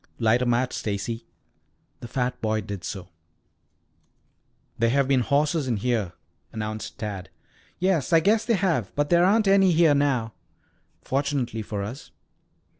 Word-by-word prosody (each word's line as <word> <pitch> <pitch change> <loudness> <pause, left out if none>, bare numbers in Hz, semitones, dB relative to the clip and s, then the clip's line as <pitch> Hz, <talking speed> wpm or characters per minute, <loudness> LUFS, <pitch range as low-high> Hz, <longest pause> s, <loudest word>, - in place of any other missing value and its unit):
"Light 115 +1 +2
a 125 - 0
match, 120 +2 +1
Stacy." 110 +3 -4 0.7
The 120 - -8
fat 125 +1 -2
boy 110 0 0
did 100 -3 -7
so. 95 0 -6 1.7
"There 115 0 +3
have 135 +2 +2
been 135 -1 +3
horses 145 +3 +1
in 120 -3 0
here," 110 -5 -1 0.4
announced 110 -1 -5
Tad. 100 -4 -5 0.5
"Yes, 180 -7 +1
I 165 - +6
guess 210 +6 +2
there 230 -2 +1
have, 165 - 0
but 145 +2 0
there 170 0 +5
aren't 210 +3 +3
any 195 -2 +5
here 165 -2 +5
now." 135 -6 +1 0.7
"Fortunately 135 -4 -1
for 105 -1 -4
us." 120 +8 -7
125 Hz, 145 wpm, -25 LUFS, 110-155 Hz, 1.7 s, I